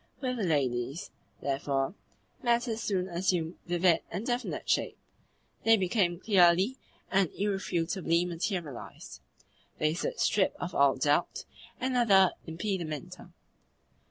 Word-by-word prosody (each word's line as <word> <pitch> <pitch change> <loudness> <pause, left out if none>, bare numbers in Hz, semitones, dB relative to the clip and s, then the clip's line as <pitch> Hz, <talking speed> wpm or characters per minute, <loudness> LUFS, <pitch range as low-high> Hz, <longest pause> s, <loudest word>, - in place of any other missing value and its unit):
With 255 -2 -2
the 220 - -2
ladies, 135 -3 -1 0.3
therefore, 135 +1 -1 0.5
matters 235 -2 +1
soon 185 -3 -1
assumed 175 -2 -1
vivid 175 -1 +3
and 190 +6 -4
definite 245 0 -2
shape; - - 0 0.7
they 225 0 +6
became 185 -3 +1
clearly 190 +3 +4 0.4
and 195 -3 +3
irrefutably 180 -3 0
materialised; 170 - -5 0.6
they 155 0 +1
stood 170 - -3
stripped 195 -2 +2
of 180 - -4
all 140 -1 +4
doubt 145 +5 0 0.3
and 260 0 -1
other 195 -6 +5 0.2
impedimenta. 165 -4 -4
180 Hz, 110 wpm, -29 LUFS, 160-205 Hz, 0.7 s, they